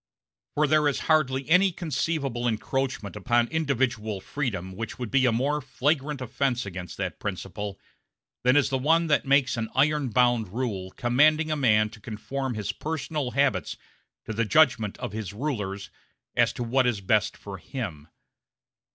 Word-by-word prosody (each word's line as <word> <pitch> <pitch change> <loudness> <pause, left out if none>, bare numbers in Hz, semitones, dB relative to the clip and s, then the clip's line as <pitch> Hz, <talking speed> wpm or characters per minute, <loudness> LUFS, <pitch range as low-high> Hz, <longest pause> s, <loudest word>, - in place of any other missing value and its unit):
For 150 - +3
there 150 0 +3
is 145 - 0
hardly 135 -4 +2
any 185 +4 +5
conceivable 140 -6 -2
encroachment 120 -1 -2
upon 120 +4 +2
individual 125 -9 -1
freedom 100 -5 -3
which 115 +2 -5
would 120 -4 -5
be 130 -1 +4
a - - +4
more 140 +6 0
flagrant 140 +1 -1
offense 125 0 -1
against 90 -2 -7
that - - -4
principle 105 -1 -5 0.6
than 125 +2 +4
is 145 - +3
one 155 +6 +3
that 150 -3 +1
makes 135 -3 +3
an 110 -1 -2
iron 145 0 +2
bound 120 -1 +3
rule 105 -6 -3
commanding 150 +9 +3
a - - +2
man 110 -6 +3
to 110 - -13
conform 125 +4 -4
his 105 -1 -2
personal 150 +1 -3
habits 130 - +1 0.5
to 110 - -4
the 115 +2 +1
judgment 130 -5 +3
of - - -5
his 105 -2 -5
rulers 105 -6 -4 0.4
as - - +4
to 120 - -4
what 125 +2 +2
is 115 -4 0
best 105 +2 +1
for 100 -2 -8
him. 95 - -6
125 Hz, 160 wpm, -26 LUFS, 110-145 Hz, 0.6 s, any